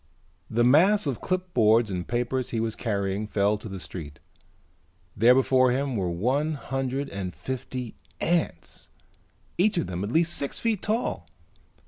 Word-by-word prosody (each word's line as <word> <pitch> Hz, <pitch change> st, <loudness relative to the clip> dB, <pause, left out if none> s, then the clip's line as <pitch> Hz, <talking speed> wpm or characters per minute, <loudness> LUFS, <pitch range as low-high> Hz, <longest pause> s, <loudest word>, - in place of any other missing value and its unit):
The 120 Hz, +1 st, +2 dB
mass 175 Hz, -, +5 dB
of 135 Hz, -5 st, -2 dB
clipboards 120 Hz, -, +2 dB
and 90 Hz, -1 st, -3 dB
papers 120 Hz, +1 st, -1 dB
he 115 Hz, -, -2 dB
was 110 Hz, -1 st, -1 dB
carrying 100 Hz, -2 st, -2 dB
fell 105 Hz, 0 st, +2 dB
to 110 Hz, -, -8 dB
the 95 Hz, -1 st, -6 dB
street. 75 Hz, -5 st, -8 dB, 1.0 s
There 120 Hz, +4 st, +6 dB
before 130 Hz, -1 st, +4 dB
him 135 Hz, +1 st, 0 dB
were 95 Hz, -4 st, -1 dB
one 130 Hz, -, 0 dB
hundred 135 Hz, 0 st, -3 dB
and 95 Hz, -4 st, -5 dB
fifty 125 Hz, -, -5 dB, 0.3 s
ants, 165 Hz, -, -2 dB, 0.7 s
each 205 Hz, +1 st, +3 dB
of 170 Hz, -, +1 dB
them 90 Hz, +1 st, -4 dB
at 100 Hz, -, -3 dB
least 165 Hz, +3 st, +2 dB
six 140 Hz, -, -2 dB
feet 225 Hz, -4 st, 0 dB
tall. 220 Hz, +4 st, -2 dB
125 Hz, 150 wpm, -26 LUFS, 100-145 Hz, 1.0 s, There